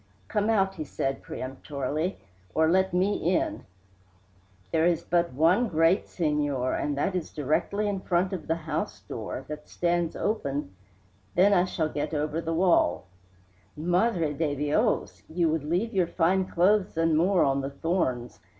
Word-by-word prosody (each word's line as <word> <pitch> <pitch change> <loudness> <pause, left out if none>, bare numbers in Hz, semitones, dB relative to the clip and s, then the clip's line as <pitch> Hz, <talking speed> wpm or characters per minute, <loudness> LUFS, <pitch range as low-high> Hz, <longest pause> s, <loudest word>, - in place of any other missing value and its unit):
"Come 210 +1 0
out," 195 -3 +2
he 155 - -5
said 135 -1 -3
peremptorily, 140 +6 -4 0.4
"or 160 0 +4
let 190 +1 +3
me 185 +4 +1 0.2
in." - - -2 1.1
"There 160 +1 +3
is 170 -1 +1
but 170 0 +1
one 175 - +3
gate, 165 +3 +3
senor, 145 -6 0
and 145 -1 -1
that 165 +7 0
is 180 -3 -3
directly 160 +8 -1
in 200 -2 -1
front 185 +1 0
of 175 -5 -5
the 165 - +1
house 155 -10 -4
door, 110 +6 -6
that 150 0 -8
stands 175 -1 0
open 140 - -2 0.3
" 95 +1 -35
"Then 195 +3 +5
I 180 -2 +4
shall 165 -3 -1
get 150 +1 -3
over 150 +2 -1
the 165 - -3
wall 165 - +2 0.4
" 90 +1 -34
"Madre 175 0 +1
de 150 -1 -1
Dios! 150 - 0
You 165 0 +1
would 155 -1 -1
leave 180 +9 -1
your 185 -3 +2
fine 185 +3 +2
clothes 185 +1 +2
and 165 -1 +3
more 180 +3 +3
on 135 0 +1
the 135 - -3
thorns. 140 -6 -2
165 Hz, 165 wpm, -27 LUFS, 145-185 Hz, 1.1 s, Then